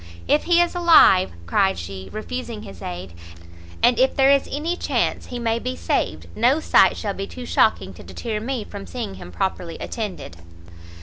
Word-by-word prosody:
"If 295 Hz, -, +2 dB
he 345 Hz, -1 st, +4 dB
is 345 Hz, 0 st, +2 dB
alive," 335 Hz, -, +6 dB
cried 95 Hz, +2 st, +2 dB
she, 95 Hz, +2 st, -7 dB
refusing 230 Hz, 0 st, -6 dB
his 95 Hz, -3 st, -11 dB
aid, 90 Hz, 0 st, -7 dB, 0.7 s
"and 240 Hz, -1 st, +4 dB
if 260 Hz, +1 st, +3 dB
there 270 Hz, 0 st, +5 dB
is 280 Hz, -1 st, +2 dB
any 315 Hz, +5 st, -2 dB
chance -, -, -1 dB
he 245 Hz, -, -6 dB
may 230 Hz, -1 st, 0 dB
be 85 Hz, -, -4 dB
saved, 85 Hz, -1 st, -2 dB
no 265 Hz, +6 st, +3 dB
sight -, -, +4 dB
shall 205 Hz, -3 st, -3 dB
be 195 Hz, 0 st, -5 dB
too 250 Hz, -1 st, -9 dB
shocking -, -, +1 dB
to -, -, -13 dB
deter 220 Hz, -3 st, -5 dB
me 240 Hz, +1 st, -3 dB
from 200 Hz, -1 st, -9 dB
seeing 230 Hz, -6 st, -5 dB
him -, -, -10 dB
properly 180 Hz, -3 st, -3 dB
attended." 205 Hz, -, -6 dB
225 Hz, 180 wpm, -22 LUFS, 165-265 Hz, 0.7 s, alive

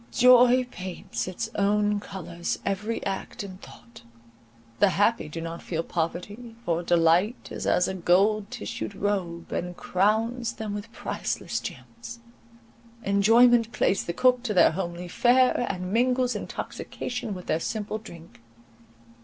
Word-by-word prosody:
Joy 250 Hz, 0 st, +6 dB
paints 185 Hz, 0 st, -5 dB
with 185 Hz, -, -6 dB
its -, -, -3 dB
own 205 Hz, +1 st, +2 dB
colours 175 Hz, -4 st, -5 dB
every 210 Hz, +3 st, -2 dB
act 195 Hz, +1 st, -4 dB
and 190 Hz, -1 st, -10 dB
thought. 235 Hz, -, -14 dB, 0.8 s
The 205 Hz, -, +5 dB
happy 205 Hz, -2 st, +1 dB
do 165 Hz, -, -6 dB
not 165 Hz, 0 st, -6 dB
feel 165 Hz, -1 st, -3 dB
poverty—for 180 Hz, +3 st, -3 dB
delight 175 Hz, +6 st, +2 dB
is -, -, -4 dB
as 180 Hz, -, +3 dB
a 190 Hz, -, -2 dB
gold 195 Hz, +4 st, +2 dB
tissued 240 Hz, -4 st, -5 dB
robe, 185 Hz, -5 st, -2 dB
and 180 Hz, 0 st, -3 dB
crowns 225 Hz, +5 st, 0 dB
them 220 Hz, -3 st, -5 dB
with 205 Hz, +2 st, -6 dB
priceless -, -, -3 dB
gems. -, -, -9 dB, 0.9 s
Enjoyment 230 Hz, +4 st, +5 dB
plays 195 Hz, -, +1 dB
the -, -, -2 dB
cook 250 Hz, +4 st, +3 dB
to 225 Hz, -4 st, -3 dB
their -, -, +6 dB
homely 175 Hz, 0 st, -4 dB
fare, 245 Hz, +5 st, +3 dB
and 185 Hz, 0 st, -4 dB
mingles 250 Hz, +1 st, +2 dB
intoxication 245 Hz, -5 st, -5 dB
with 180 Hz, -, -9 dB
their 160 Hz, -, 0 dB
simple 215 Hz, +4 st, -3 dB
drink. 170 Hz, -, -13 dB
205 Hz, 135 wpm, -26 LUFS, 180-230 Hz, 0.9 s, Joy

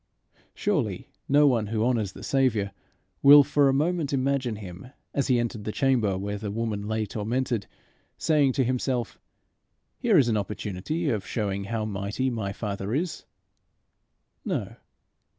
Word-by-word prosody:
Surely, -, -, -1 dB, 0.2 s
no 145 Hz, +2 st, +6 dB
one 120 Hz, -6 st, +2 dB
who 110 Hz, +1 st, 0 dB
honours 110 Hz, -6 st, 0 dB
the -, -, -11 dB
Saviour 115 Hz, -7 st, +1 dB, 0.5 s
will 145 Hz, +1 st, +9 dB
for 140 Hz, 0 st, +3 dB
a -, -, +2 dB
moment 155 Hz, +1 st, 0 dB
imagine 135 Hz, -3 st, 0 dB
him, 95 Hz, -1 st, -9 dB, 0.3 s
as 140 Hz, -, 0 dB
he 125 Hz, -, +3 dB
entered 120 Hz, -2 st, -2 dB
the 110 Hz, -, -3 dB
chamber 120 Hz, -7 st, +1 dB
where 100 Hz, +1 st, -4 dB
the 105 Hz, 0 st, -4 dB
woman 105 Hz, -1 st, -3 dB
lay 110 Hz, 0 st, -1 dB
tormented, 115 Hz, +1 st, -2 dB, 0.5 s
saying 150 Hz, -4 st, +3 dB
to 135 Hz, -, +2 dB
himself, 125 Hz, -1 st, -1 dB, 0.8 s
"Here 225 Hz, -6 st, +4 dB
is 135 Hz, -5 st, +5 dB
an 110 Hz, -2 st, +2 dB
opportunity 105 Hz, -, -2 dB
of 110 Hz, -4 st, -3 dB
showing 100 Hz, -3 st, -2 dB
how 110 Hz, +1 st, -2 dB
mighty 105 Hz, +5 st, -2 dB
my 110 Hz, -4 st, -3 dB
Father 100 Hz, +1 st, -3 dB
is!" 170 Hz, +3 st, -3 dB, 1.2 s
No. -, -, -3 dB
115 Hz, 150 wpm, -26 LUFS, 105-135 Hz, 1.2 s, will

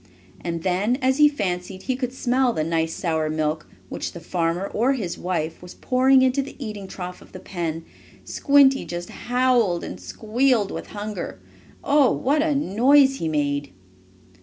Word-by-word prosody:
And 170 Hz, -1 st, -3 dB
then, 195 Hz, +6 st, +1 dB
as 265 Hz, +1 st, +1 dB
he 300 Hz, 0 st, +7 dB
fancied 185 Hz, -7 st, -4 dB
he 260 Hz, -, -1 dB
could 250 Hz, -1 st, -3 dB
smell 255 Hz, -1 st, +1 dB
the 155 Hz, -, -1 dB
nice 165 Hz, 0 st, -1 dB
sour 160 Hz, -3 st, -1 dB
milk, 155 Hz, 0 st, -2 dB, 0.2 s
which -, -, -5 dB
the 170 Hz, -, -8 dB
farmer 170 Hz, +2 st, -1 dB
or 240 Hz, +7 st, +1 dB
his 200 Hz, -10 st, -3 dB
wife 165 Hz, -3 st, -3 dB
was 180 Hz, 0 st, -11 dB
pouring 260 Hz, +1 st, +3 dB
into 260 Hz, +2 st, +2 dB
the 275 Hz, -, -9 dB
eating 210 Hz, -7 st, -6 dB
trough 180 Hz, -1 st, -7 dB
of -, -, -17 dB
the 185 Hz, -, -8 dB
pen, 165 Hz, -3 st, -4 dB, 0.4 s
Squinty 275 Hz, -1 st, +4 dB
just 175 Hz, 0 st, -6 dB
howled 245 Hz, -7 st, +1 dB
and 90 Hz, -, -7 dB
squealed 220 Hz, -, 0 dB
with -, -, -6 dB
hunger. 205 Hz, -2 st, -6 dB, 0.4 s
Oh, 285 Hz, -2 st, +4 dB
what 295 Hz, +3 st, +1 dB
a 305 Hz, -2 st, +1 dB
noise 270 Hz, +3 st, +4 dB
he 165 Hz, -, -3 dB
made! 145 Hz, -3 st, -1 dB
205 Hz, 165 wpm, -23 LUFS, 170-260 Hz, 0.4 s, he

